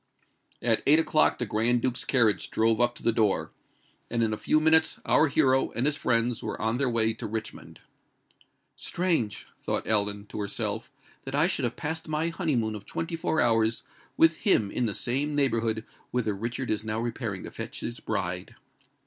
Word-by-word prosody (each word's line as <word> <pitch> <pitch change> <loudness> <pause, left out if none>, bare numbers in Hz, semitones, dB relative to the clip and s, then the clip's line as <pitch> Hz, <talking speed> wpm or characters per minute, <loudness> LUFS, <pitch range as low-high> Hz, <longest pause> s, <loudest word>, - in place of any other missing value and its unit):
At 115 -2 +2
eight 150 +2 +7
o'clock 155 -1 +3
the 125 - -2
Grand 115 +3 +1
Duke's 130 -1 0
carriage 115 -7 +2
drove 115 +1 +2
up 120 0 +2
to - - -9
the 115 - +3
door; 110 -3 +1 0.6
and 115 -1 0
in 110 -1 0
a - - 0
few 155 - +2
minutes 160 +1 +4
our 160 - +4
hero 135 -2 +2
and 120 +4 0
his 150 0 +3
friends 115 -3 0
were - - -5
on 110 +2 0
their 135 -1 +1
way 115 -1 +2
to 115 0 -6
Richmond. 110 +1 -6 0.9
"Strange!" 160 - -1
thought - - -2
Ellen 105 -1 0
to 105 - -6
herself; 105 +2 -3 0.3
"that 135 +1 -4
I 150 +3 +4
should 170 -7 0
have 120 - -2
passed 160 +1 -4
my 155 +2 0
honeymoon 145 -11 -1
of 105 -2 -8
twenty 165 0 -3
four 160 -1 0
hours 115 -1 +2 0.3
with 165 0 +5
him 110 - +2
in 120 - 0
the 105 - -2
same 140 +4 -1
neighbourhood 115 -5 0 0.2
whither 115 -4 -1
Richard 120 +5 -3
is 110 0 -1
now 110 0 -2
repairing 115 -4 -4
to - - -8
fetch - - -6
his - - -5
bride." - - -3
120 Hz, 185 wpm, -27 LUFS, 110-145 Hz, 0.9 s, eight